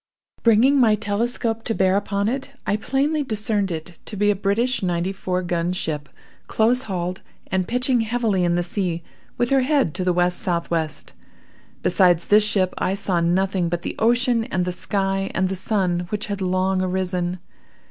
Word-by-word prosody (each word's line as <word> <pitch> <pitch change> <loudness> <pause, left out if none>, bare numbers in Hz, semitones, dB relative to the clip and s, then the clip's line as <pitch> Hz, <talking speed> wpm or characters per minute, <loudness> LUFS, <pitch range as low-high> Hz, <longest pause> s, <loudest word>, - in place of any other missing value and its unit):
Bringing 240 +5 +5
my 225 -4 +5
telescope 225 +2 -1
to 225 - -1
bear 190 0 +3
upon 200 0 0
it, 270 +3 -2
I 200 - +1
plainly 275 +7 0
discerned 215 -4 0
it 165 0 -6
to - - -7
be 205 +1 +3
a - - 0
British 215 +7 0
ninety 180 0 -1
four 185 -1 -2
gun 175 0 -1
ship, 150 -4 -3 0.4
close 235 +3 +2
hauled, 180 0 -3 0.3
and 185 -1 0
pitching 250 0 +1
heavily 225 -4 0
in 175 0 +2
the 175 - +1
sea 175 -2 -2 0.3
with 240 +1 0
her 270 -1 +4
head 265 - +1
to 185 - 0
the 180 - +1
W.S.W. 175 -2 0 1.0
Besides 175 -2 +3
this 210 +1 +5
ship, 195 -3 +1
I 190 - 0
saw 190 -3 0
nothing 180 +1 +1
but 175 0 -3
the - - -4
ocean 235 0 +2
and 180 -4 -1
the 180 - -1
sky, 195 +1 -1
and 185 0 +1
the 190 - -2
sun, 180 -3 -1
which 210 0 -3
had 200 -3 -4
long 185 0 +1
arisen. 180 -1 -1
195 Hz, 175 wpm, -22 LUFS, 180-225 Hz, 1.0 s, Bringing